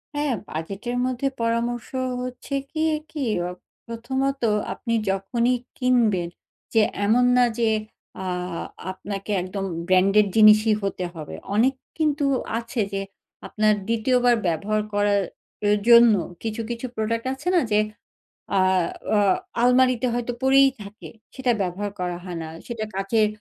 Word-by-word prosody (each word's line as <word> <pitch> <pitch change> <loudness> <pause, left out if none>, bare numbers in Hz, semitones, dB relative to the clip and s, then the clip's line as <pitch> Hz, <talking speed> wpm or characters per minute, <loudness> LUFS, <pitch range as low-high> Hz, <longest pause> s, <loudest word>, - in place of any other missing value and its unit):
হ্যাঁ, 290 -2 0 0.2
বাজেটের 195 +10 -4
মধ্যে 255 +1 -1
পরামর্শ 235 +1 -1 0.3
হচ্ছে 250 +2 -5 0.2
কি, 315 -1 -1 0.3
কি? 300 -3 -3 0.2
অ - - -4 0.4
প্রথমত, 265 +4 -2 0.3
আপনি 230 -2 -4 0.2
যখনই 235 +6 +1 0.2
কিনবেন 230 -9 +2 0.4
যে 225 - +5 0.2
এমন 240 +4 +4
না 245 - +6
যে, 230 -1 +3 0.5
আ - - -5 0.7
আপনাকে 195 +2 -6
একদম 195 +2 -4 0.2
ব্র্যান্ডেড 195 +3 +4
জিনিসই 215 0 +6
হতে 195 -2 -2
হবে। 155 -2 -7 0.2
অনেক 250 +5 +4 0.2
কিন্তু 300 -2 +1 0.3
আছে 230 0 -3
যে 195 - -1 0.5
আপনার 215 0 +2
২য় 230 +3 +2
বার 245 -1 +6
ব্যবহার 205 +6 0
করা 205 0 +2 0.6
এর 210 - +4
জন্য 235 -1 +8 0.3
কিছু, 220 0 -3
কিছু 235 +1 -4
প্রোডাক্ট 230 +2 -2
আছে 265 +6 -9
না? - - +6
যে 210 - +4 0.8
আ - - +4 0.6
আ - - +4 0.4
আলমারিতে 250 0 +4
হয়তো 245 0 -2
পড়েই 270 +1 +6
থাকে, 205 +2 -10 0.3
সেটা 260 -2 +1
ব্যবহার 195 +2 -2
করা 180 -1 -2
হয় 180 -2 -6
না। - - -6 0.2
সেটা 230 -3 -4
কাচের 210 +3 +2
230 Hz, 135 wpm, -24 LUFS, 205-250 Hz, 0.8 s, জন্য